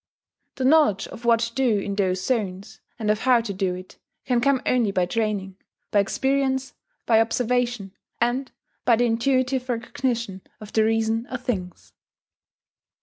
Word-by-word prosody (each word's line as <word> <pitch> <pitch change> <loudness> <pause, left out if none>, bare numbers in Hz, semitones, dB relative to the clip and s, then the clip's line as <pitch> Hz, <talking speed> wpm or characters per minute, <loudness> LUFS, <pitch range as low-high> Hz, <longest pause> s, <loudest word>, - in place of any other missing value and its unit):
The 260 - -2
knowledge 275 -9 +4
of 235 - -10
what 230 -1 +4
to 230 0 -2
do 250 -5 +2
in 200 0 -3
those 190 -2 0
zones, 200 -6 -3 0.2
and 215 -2 +1
of 210 - 0
how 250 -1 +4
to 220 -3 -5
do 185 -1 -1
it, 185 +1 -11 0.3
can 245 -2 +1
come 275 +1 +3
only 245 -4 +2
by 185 -2 +1
training, 200 -2 -2 0.3
by 205 - +4
experience, 265 +5 0 0.3
by 225 -1 +5
observation, 240 -3 0 0.3
and 245 +3 0 0.3
by 240 - +5
the 240 +2 +2
intuitive 255 +2 +1
recognition 235 -4 -2 0.2
of 215 -1 -11
the 220 - +4
reason 225 +1 0
of 255 -1 -6
things. 185 -8 -4
230 Hz, 155 wpm, -24 LUFS, 200-255 Hz, 0.3 s, by